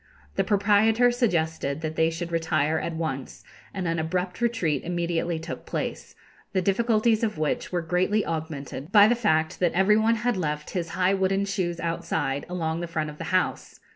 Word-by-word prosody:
The - - +2
proprietor 215 +4 +4
suggested 160 - 0
that 160 -1 -3
they 160 0 +3
should 170 +1 -5
retire 160 -2 +1
at 170 - -4
once, 135 -5 -4 0.3
and 190 -3 -3
an 165 0 0
abrupt 180 +5 -2
retreat 180 - 0
immediately 170 -1 -1
took 160 +1 -7
place, - - -4 0.4
the 190 - +2
difficulties 220 +3 +2
of 215 -6 -1
which 155 -1 -1
were 175 -2 -1
greatly 185 +5 +1
augmented 155 -2 -5
by 205 -1 +8
the 240 - +4
fact 160 -10 +1
that 175 -2 +2
every 195 +4 +4
one 225 +1 +3
had 235 0 0
left 150 -3 -3
his 170 -2 -3
high 185 +1 +3
wooden 195 +1 +1
shoes 180 -4 -2
outside, 165 -5 -2
along 165 -2 -2
the 175 - -4
front 155 -2 -2
of 150 - -14
the - - -4
house. 185 0 -1
175 Hz, 180 wpm, -26 LUFS, 160-200 Hz, 0.4 s, by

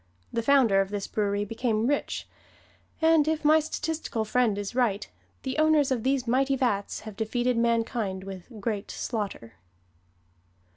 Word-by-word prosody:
The 230 - 0
founder 230 -6 +4
of 195 - -2
this 205 -1 -3
brewery 205 -1 -1
became 225 0 -1
rich; 285 +3 -1 0.8
and 320 -2 +5
if 315 -1 -1
my 310 +1 +6
statistical 310 -7 -3
friend 225 -2 +2
is 205 +1 -4
right, 230 -5 +1 0.4
the 265 +2 -2
owners 310 -3 +4
of 250 -3 +1
these 265 +1 +1
mighty 270 +3 +2
vats 220 -7 -1
have 215 -2 -9
defeated 240 +3 0
mankind 230 -4 0
with 190 -2 -8
"great 205 -1 -3
slaughter." 200 - -4
230 Hz, 145 wpm, -27 LUFS, 205-270 Hz, 0.8 s, my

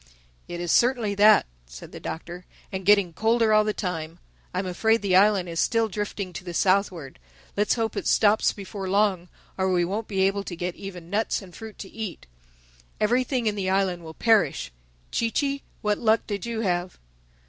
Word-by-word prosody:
"It 175 - -6
is 175 -1 -1
certainly 240 -4 +3
that," 210 +1 +6 0.2
said - - -11
the - - -9
Doctor—"and 180 +3 -8
getting 200 -4 +5
colder 225 +2 +2
all 215 0 +5
the 215 - 0
time. 170 -5 -4 0.3
I'm 185 +1 -2
afraid 220 +5 +1
the 190 -2 +2
island 195 -1 +4
is 165 -1 -4
still 230 -1 +2
drifting 205 -2 -4
to 180 - -7
the 175 -2 -7
southward. 185 -7 0 0.4
Let's 210 +1 +2
hope 225 -2 -2
it - - -3
stops 215 0 +4
before 195 -1 -6
long, 195 -3 +1 0.3
or 190 0 +1
we 175 -1 +2
won't 210 +5 -3
be 195 -2 -1
able 195 +1 +1
to 175 - -5
get 175 +1 -3
even 180 -3 -9
nuts 215 0 0
and 180 -2 -14
fruit 220 -1 -10
to 195 - -8
eat—everything 60 - -4
in 215 - +2
the 195 -2 -2
island 190 -2 0
will 160 -1 -10
perish—Chee 65 - 0
Chee, 280 +3 -1 0.2
what 210 -1 +1
luck 225 -1 +2
did 205 +1 -4
you 230 -1 -2
have?" 180 -3 -1
195 Hz, 180 wpm, -25 LUFS, 175-215 Hz, 0.4 s, that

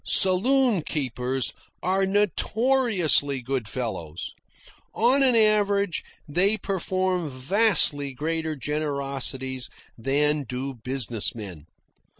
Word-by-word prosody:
Saloon 225 +3 +3
keepers 130 -3 -2 0.3
are 190 +1 +1
notoriously 205 - +2
good 125 -2 -3
fellows. 95 -9 -5 0.6
On 250 +5 +3
an 260 -3 +4
average 205 -4 +2 0.2
they 185 +8 +2
perform 185 -3 -1
vastly 145 - +3
greater 160 +3 -3
generosities 135 -3 -3 0.3
than 150 +4 +1
do 130 +1 -5
business 120 -3 -2
men. 95 -9 -9
150 Hz, 90 wpm, -25 LUFS, 130-200 Hz, 0.6 s, an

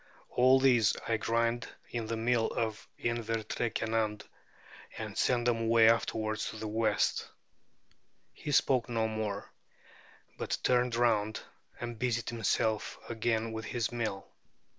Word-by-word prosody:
All 130 +1 +5
these 120 -5 +4
I 115 - +2
grind 115 +1 0 0.2
in 115 -2 -3
the 115 0 -2
Mill 115 0 +2
of 110 -2 -3
Inver 115 -2 -2
tre 120 - -1
Kenand 110 -1 -1 0.7
and - - -5
send 120 -1 +2
them 120 -2 +2
away 115 0 +6
afterwards 110 -1 0
to - - -8
the 110 0 -4
west." 110 -1 +1 1.0
He 150 - -6
spoke 130 -3 +3
no 115 -2 +1
more, 110 -2 -4 0.9
but - - -1
turned 125 -1 +2
round 110 -3 +1 0.4
and 120 -1 -5
busied 120 -2 0
himself 110 -1 0
again 115 -1 0
with 110 0 -5
his 120 0 -2
mill. 110 -5 -3
115 Hz, 135 wpm, -31 LUFS, 110-120 Hz, 1.0 s, away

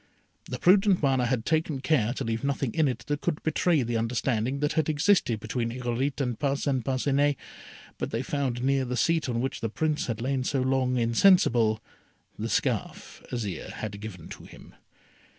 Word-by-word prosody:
The - - -5
prudent 190 -1 +4
Mana 130 -3 +2
had 120 -2 -1
taken 160 -3 0
care 130 -6 +1
to 135 - -3
leave 115 0 -2
nothing 140 -3 -1
in 160 -2 +2
it 120 -3 -3
that 145 +2 -2
could 165 -3 -2
betray 160 -1 +2
the 120 0 -1
understanding 115 +2 -1
that 150 +1 0
had 160 -2 +1
existed 155 - +2
between 115 +2 -2
Irolite 125 +3 -2
and 125 -5 -2
Parcin 140 -2 0
Parcinet; 140 +3 +1 0.6
but - - -2
they 115 +3 -2
found 130 -3 -2
near 135 0 +2
the 125 0 -3
seat 160 -2 +1
on 115 -1 -1
which 135 +1 -3
the 115 - -1
Prince 155 +6 -1
had 115 -2 -3
lain 130 +2 -1
so 135 +1 0
long 130 -1 +1
insensible, 115 - +4 0.6
the - - -3
scarf - - -2
Azire 110 -7 -4
had 100 -2 -6
given 95 -6 -8
to - - -10
him. - - -14
130 Hz, 180 wpm, -27 LUFS, 115-145 Hz, 0.6 s, prudent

